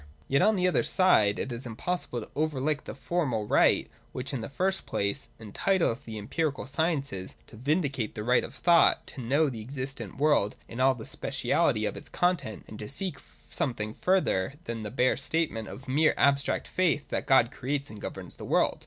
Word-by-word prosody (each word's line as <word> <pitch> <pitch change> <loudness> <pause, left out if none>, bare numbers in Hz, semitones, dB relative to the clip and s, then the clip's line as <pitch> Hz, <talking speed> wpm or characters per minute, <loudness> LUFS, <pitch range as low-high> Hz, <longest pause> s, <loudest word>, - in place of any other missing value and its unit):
Yet 140 +1 +3
on 215 0 +4
the 180 -1 +2
other 180 - +3
side 110 - +4
it 130 - -3
is 120 +2 -5
impossible 120 +1 -3
to - - -10
overlook 150 -1 0
the - - -6
formal 130 -7 -1
right - - +4 0.3
which, 130 +2 -5
in 130 - -2
the 115 - -5
first 190 +7 -1
place, 100 0 -1
entitles 115 - 0
the 115 -6 -7
empi 155 +9 0
rical 135 - -8
sciences 140 - -2
to - - -14
vindicate 140 -2 -1
the 105 - -4
right 125 +2 +3
of - - -7
thought 170 -1 +4
to 130 - -8
know 140 +6 +2
the 120 -5 -4
existent 135 +4 -6
world 140 -8 +3
in 115 - -8
all 130 0 +4
the 110 - -9
speciality - - 0
of - - -2
its - - -10
content, 155 - -1
and 105 - -10
to 105 - -6
seek 185 +6 -3 0.3
something 110 -5 -2
further 140 - +1
than 115 -5 -4
the 105 - -4
bare 130 +2 +2
statement 140 -6 -1
of 135 +1 -10
mere 150 +4 +3
abstract 140 0 +2
faith 170 -5 +1
that - - -2
God 130 -4 +5
creates 140 +2 -3
and 105 - -10
governs - - -7
the - - -9
world. - - +2
135 Hz, 195 wpm, -28 LUFS, 115-155 Hz, 0.3 s, God